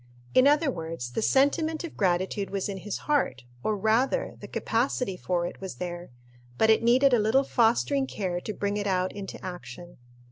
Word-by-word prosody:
In 255 +2 +6
other 295 0 +3
words, 160 - -5
the 125 - -2
sentiment 310 +7 +2
of 335 - -7
gratitude 190 +1 0
was 195 -1 -2
in 200 -2 -4
his 200 +2 -4
heart, 270 - 0 0.2
or, 215 +7 0
rather, 230 - +1
the - - -9
capacity 235 -3 -1
for 175 -1 -1
it 175 - -7
was 190 -1 -6
there, 175 0 -6 0.5
but 220 - +5
it 220 - +4
needed 250 +3 +4
a 240 - +5
little 220 +6 +3
fostering 265 +3 +2
care 180 -6 -3
to 215 - -4
bring 205 0 -2
it 205 -1 -2
out 185 -1 +1
into 200 -1 -7
action. 175 -1 -8
205 Hz, 185 wpm, -27 LUFS, 180-260 Hz, 0.5 s, In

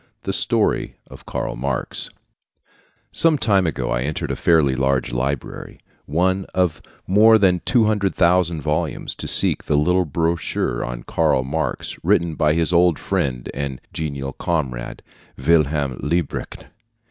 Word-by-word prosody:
THE - - -2
STORY - - +1 0.2
OF - - -13
KARL - - -3
MARX 65 0 -3 1.0
Some 165 -2 +3
time 100 -8 +2
ago 80 - -3
I 65 -2 0
entered 75 +4 -3
a - - -2
fairly 80 -6 +3
large 65 -1 0
library 65 +2 -4 0.3
one 95 +5 0
of 90 -4 0 0.2
more 110 +4 +6
than 90 -4 +2
two 120 -4 +3
hundred 105 -3 0
thousand 85 -2 +2
volumes 75 +2 -1
to - - -6
seek - - +4
the 75 - +1
little 90 +4 +2
brochure 80 -5 -1
on - - -6
Karl 65 - +1
Marx 75 +5 -4
written 85 -1 +2
by 75 0 +1
his 85 +1 0
old 85 -2 +4
friend 60 -3 -2
and 70 -1 -4
genial 70 -3 -4
comrade 65 -8 -3 0.3
Wilhelm 70 -2 +1
Liebknecht. 85 +2 -3
80 Hz, 140 wpm, -21 LUFS, 70-90 Hz, 1.0 s, more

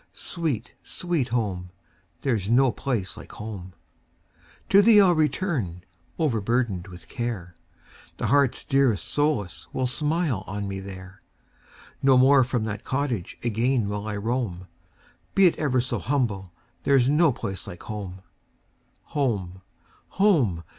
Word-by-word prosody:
sweet, 150 - -3
sweet 170 -8 -2
home! 100 -7 -2 0.5
There 135 -4 +1
's 100 -1 -3
no 130 +2 +5
place 115 -11 -3
like - - -11
home! 100 -4 -7 1.0
To 200 - +7
thee 215 0 +7
I 200 - +7
'll - - +5
return, 150 - -1 0.3
overburdened 115 - 0
with 90 -1 -12
care; 115 -8 -4 0.6
The - - -2
heart's 140 +2 +2
dearest 135 -7 +2
solace 105 - -1
will 130 - 0
smile 150 - 0
on 100 0 -4
me 95 0 -4
there; 95 0 -10 0.8
No 135 -1 +5
more 135 +1 +6
from 125 -2 -1
that 110 -1 -4
cottage 130 -9 -2
again 120 0 +1
will 105 +1 -4
I 105 - -3
roam; 105 -5 -2 0.7
Be 195 - +6
it 175 - +5
ever 135 -5 +2
so 120 +1 -1
humble, 110 -10 -1 0.3
there 140 -1 +4
's 125 - +2
no 150 +2 +4
place 95 -6 -5
like 90 - -9
home. 95 -3 -6 0.9
Home! 100 -10 -1 0.6
home! 140 - +3
120 Hz, 140 wpm, -25 LUFS, 100-140 Hz, 1.0 s, To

